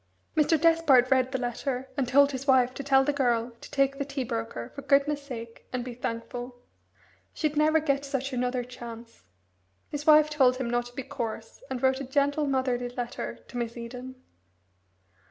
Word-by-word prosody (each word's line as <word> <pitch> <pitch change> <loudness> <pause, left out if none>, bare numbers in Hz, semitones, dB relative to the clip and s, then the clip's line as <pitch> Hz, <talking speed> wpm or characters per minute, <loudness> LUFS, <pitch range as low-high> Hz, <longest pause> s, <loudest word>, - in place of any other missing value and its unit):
Mr. 310 +1 +3
Despard 300 -6 +4
read 260 -1 +3
the 265 - 0
letter, 250 +1 -3
and 270 -3 0
told 280 +3 +5
his 270 +1 -5
wife 255 -2 +4
to 280 - -5
tell 270 -1 +4
the 290 +2 0
girl 240 -4 +1
to - - -10
take 275 0 +1
the - - +1
tea 275 -1 -3
broker, 115 - -4
for - - -7
goodness' 285 +1 +2
sake, 235 -5 -9
and 250 -1 -3
be 250 - -6
thankful. 245 +1 -5 0.8
She'd 305 -1 -1
never 310 +1 +4
get 280 -2 0
such 275 -1 -3
another 250 0 -1
chance. 235 -1 -10 0.6
His 290 0 -5
wife 305 0 +7
told 260 -4 +4
him 260 -2 -2
not 240 0 0
to 245 - -15
be 270 - -4
coarse, 230 -4 -6
and 260 -1 -4
wrote 265 0 +3
a - - -4
gentle, 285 +2 +1
motherly 255 -2 0
letter 235 - -5
to - - -8
Miss 235 0 -3
Eden. 250 +2 -7
260 Hz, 185 wpm, -28 LUFS, 245-280 Hz, 0.8 s, wife